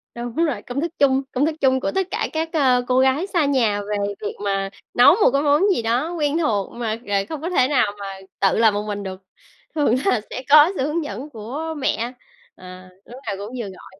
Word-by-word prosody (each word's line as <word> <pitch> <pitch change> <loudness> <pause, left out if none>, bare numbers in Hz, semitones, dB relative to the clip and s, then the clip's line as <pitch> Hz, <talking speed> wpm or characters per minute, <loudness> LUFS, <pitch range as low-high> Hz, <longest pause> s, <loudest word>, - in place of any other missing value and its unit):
Đúng 240 0 -6
rồi, 325 -5 0
công 255 +3 -4
thức 335 - -2
chung 270 -1 +4
công 270 +3 +1
thức 315 0 -1
chung 260 -1 +3
của - - -2
tất 385 -1 -1
cả 435 - -1
các, 320 +1 -1
a, 260 -5 +3
cô 255 0 +3
gái 265 +7 +2
xa 345 -6 +1
nhà 230 -7 +1
về 205 +1 -3 0.2
việc 210 - -4
mà 195 -1 -1 0.2
nấu 245 +7 +7
một 410 - +4
cái 275 - +2
món 290 +1 +3
gì - - -1
đó 245 +9 0
quen 300 -2 0
thuộc 215 - 0
mà, 225 -2 -3
ờ, 205 - -3 0.2
không 310 -3 -5
có 335 - -3
thể 260 -8 +3
nào 255 -7 +2
mà 200 - -6 0.3
tự 195 - +2
làm 220 -1 +4
một 205 +1 -2
mình 205 -1 -4
được, 190 -1 -7 0.5
thường 290 -6 +2
là 390 - +2
sẽ 255 - -6
có 300 +4 +8
sự - - 0
hướng 320 +2 -1
dẫn 255 +4 -6
của 280 +7 -5
mẹ. 240 -3 -1 0.4
Ờ, 185 0 -12 0.2
lúc 245 +2 -11
nào 200 - -1
cũng 205 +5 -7
vừa 240 - -3
gọi 190 0 -14
255 Hz, 235 wpm, -21 LUFS, 210-300 Hz, 0.5 s, có